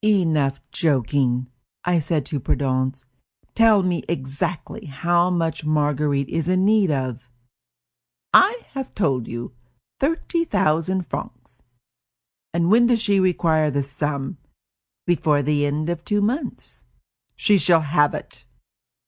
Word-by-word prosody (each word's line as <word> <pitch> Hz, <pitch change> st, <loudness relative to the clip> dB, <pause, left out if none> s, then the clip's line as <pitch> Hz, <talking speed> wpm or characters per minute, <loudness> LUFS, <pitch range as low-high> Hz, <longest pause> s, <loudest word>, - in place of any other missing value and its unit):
"Enough 160 Hz, -10 st, +2 dB
joking," 130 Hz, -4 st, +1 dB, 0.4 s
I 175 Hz, -1 st, +2 dB
said 155 Hz, -2 st, -1 dB
to 150 Hz, -4 st, -3 dB
Prudence; 130 Hz, 0 st, -1 dB, 0.5 s
"tell 220 Hz, -3 st, +5 dB
me 180 Hz, -2 st, 0 dB
exactly 165 Hz, +7 st, -4 dB
how 170 Hz, +5 st, +1 dB
much 165 Hz, -3 st, -1 dB
Marguerite 150 Hz, -2 st, 0 dB
is 165 Hz, +1 st, -2 dB
in 185 Hz, +1 st, +2 dB
need 210 Hz, -3 st, +3 dB
of." 130 Hz, -4 st, -3 dB, 1.0 s
"I 450 Hz, +6 st, +5 dB
have 270 Hz, -2 st, -6 dB
told 135 Hz, -, 0 dB
you: 120 Hz, +1 st, -6 dB, 0.5 s
thirty 330 Hz, +3 st, 0 dB
thousand 185 Hz, -, 0 dB
francs." -, -, -8 dB, 0.9 s
"And 170 Hz, +2 st, +1 dB
when 235 Hz, +2 st, +5 dB
does 240 Hz, -1 st, +2 dB
she 205 Hz, -3 st, +2 dB
require 165 Hz, -4 st, +2 dB
this 140 Hz, -1 st, -2 dB
sum?" 145 Hz, +2 st, -3 dB, 0.7 s
"Before 160 Hz, -4 st, +2 dB
the 145 Hz, 0 st, +1 dB
end 150 Hz, +2 st, -2 dB
of 170 Hz, -1 st, -3 dB
two 205 Hz, -1 st, 0 dB
months." 240 Hz, +9 st, -3 dB, 0.5 s
"She 205 Hz, -2 st, +3 dB
shall 170 Hz, -2 st, +4 dB
have 145 Hz, -1 st, +2 dB
it." -, -, -8 dB
160 Hz, 125 wpm, -22 LUFS, 140-190 Hz, 1.0 s, tell